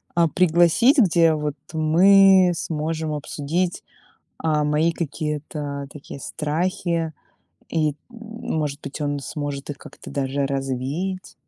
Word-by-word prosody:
а, 170 -1 +4
пригласить, 175 - +4
где 170 -6 +5
вот 150 -2 -2 0.2
мы 185 +4 +6
сможем 160 0 -3
обсудить, 155 +4 -2 0.6
а, 155 -2 +1
мои 150 +3 +2
какие-то 150 -2 -4
такие 140 -1 -10
страхи. 165 +2 -2 0.6
И, 155 -3 +1 0.2
может 220 - -4
быть, 145 - -7
он 145 -1 -1
сможет 145 0 -5
их 145 - -6
как-то - - -12
даже 140 0 -1
развеять. 135 +8 -3
155 Hz, 110 wpm, -23 LUFS, 145-175 Hz, 0.6 s, мы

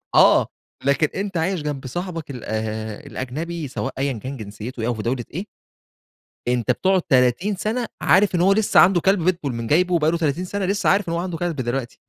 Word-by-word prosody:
آه، - - +6 0.4
لكن 140 +2 +3
أنت 195 -2 -2
عايش 175 +1 0
جنب 145 -3 -4
صاحبك 165 +1 -5
ال 125 -4 -8
آآ 110 -1 -3
الأجنبي 155 +5 -5
سواء 135 +1 -4
أيًا 135 0 0
كان 130 +5 -6
جنسيته 110 +3 -7
إيه، 115 - -1
أو 120 - +1
في 110 - -5
دولة 120 0 -1
إيه 185 +7 -4 1.0
أنت 120 -2 +1
بتقعد 190 -1 +2
30 130 - +2
سنة 225 +5 -2
عارف 190 0 +4
إن 170 - +2
هو 195 +2 +5
لسه 215 0 +4
عنده 180 -2 +6
كلب 195 -3 +2
بيتبول 170 -8 0
م 115 -1 -4
جايبه 180 +4 +3
وبقى 160 -2 +3
له 170 - 0
30 165 +2 -1
سنة، 200 +1 -2
لسه 200 +2 +1
عارف 195 -2 +2
إن - - -1
هو 170 - 0
عنده 175 -2 -3
كلب 175 -1 -2
دلوقتي، 125 -1 -3
160 Hz, 210 wpm, -22 LUFS, 125-185 Hz, 1.0 s, آه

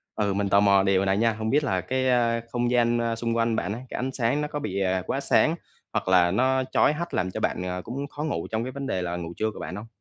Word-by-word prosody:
Ừ, 100 -2 0
mình 100 0 -1
tò 100 - +5
mò 100 -1 +5
điều 95 0 +2
này 95 0 +2
nha, 115 +1 +2
hông 110 0 -3
biết 145 +4 +3
là 95 -9 0
cái, 130 +6 0
a, 115 -2 +2
không 120 0 0
gian, 120 -1 +3
a, 115 -1 0
xung 115 0 -2
quanh 115 0 +1
bạn 100 -1 -2
á, 115 - -5
cái - - -6
ánh 130 +1 -2
sáng 125 +3 0
nó 150 - -1
có 150 0 -4
bị, 100 -6 -3
à, 95 0 +1
quá - - -1
sáng - - +3 0.4
hoặc - - -1
là 90 -2 +4
nó 130 +5 +2
chói 150 - +4
hắt 170 +2 -5
làm 90 0 0
cho - - -4
bạn, 90 - -1
ờ, 90 0 -3
cũng 135 +7 -5
khó 145 +1 -6
ngủ 155 - -2
trong 110 +1 -1
cái 130 - -4
vấn 140 0 -5
đề 95 - -1
là 85 0 -3
ngủ 85 -1 -5
trưa 110 0 0
của - - -11
bạn 90 - -5
hông? 105 +3 -8
115 Hz, 300 wpm, -25 LUFS, 95-130 Hz, 0.4 s, tò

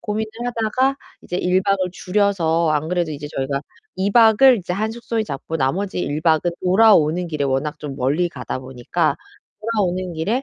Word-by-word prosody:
고민을 215 +1 -3 0.2
하다가 245 +3 0 0.3
이제 180 - -4
1 185 +1 +2
박을 195 0 +1
줄여서 180 -4 +1
안 155 +1 0
그래도 175 -2 -1
이제 145 0 -6
저희가 140 +1 -2 0.3
2 190 +2 0
박을 230 +3 +6
이제 180 -2 -4
한 215 +3 -1
숙소에 230 -1 -3
잡고 160 -1 -5
나머지 180 +8 -1
1 145 -2 -2
박은 160 +1 +2
돌아오는 180 -4 +4
길에 150 -3 -2
워낙 140 +3 -1
좀 145 -3 -7
멀리 145 +7 +1
가다 125 -6 -5
보니까 130 -2 -2 0.4
'돌아오는 185 -5 -1
길에 210 +12 -1
180 Hz, 340 characters per minute, -21 LUFS, 150-210 Hz, 0.4 s, 박을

